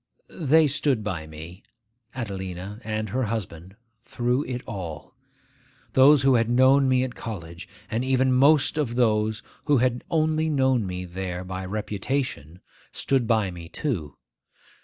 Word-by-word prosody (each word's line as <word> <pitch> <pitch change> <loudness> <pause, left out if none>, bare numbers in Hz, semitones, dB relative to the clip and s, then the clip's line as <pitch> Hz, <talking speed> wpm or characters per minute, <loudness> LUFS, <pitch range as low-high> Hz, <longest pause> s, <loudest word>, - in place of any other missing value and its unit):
They 160 0 +5
stood 140 -5 +1
by 85 -7 -4
me, 80 +5 -10 0.5
Adelina 95 -2 -6
and 110 0 -3
her 130 +4 -1
husband, 95 -4 -5 0.3
through 125 +4 -1
it 125 -1 -5
all. 90 -7 -7 0.8
Those 135 +1 +6
who 135 -1 +5
had 115 -2 +2
known 130 +2 +5
me 130 0 +3
at 130 -2 -4
college, 85 -8 -8 0.2
and 115 +4 -2
even 130 0 +2
most 145 +3 +4
of 120 -6 -1
those 110 -3 +1 0.2
who 145 -2 +4
had 125 0 +1
only 155 -1 +1
known 130 -7 +2
me 90 0 -5
there 90 0 -5
by 95 0 -5
reputation, 105 - -3 0.3
stood 130 -4 0
by 110 -5 +2
me 85 -1 -10
too. 95 - -3
115 Hz, 140 wpm, -25 LUFS, 95-130 Hz, 0.8 s, Those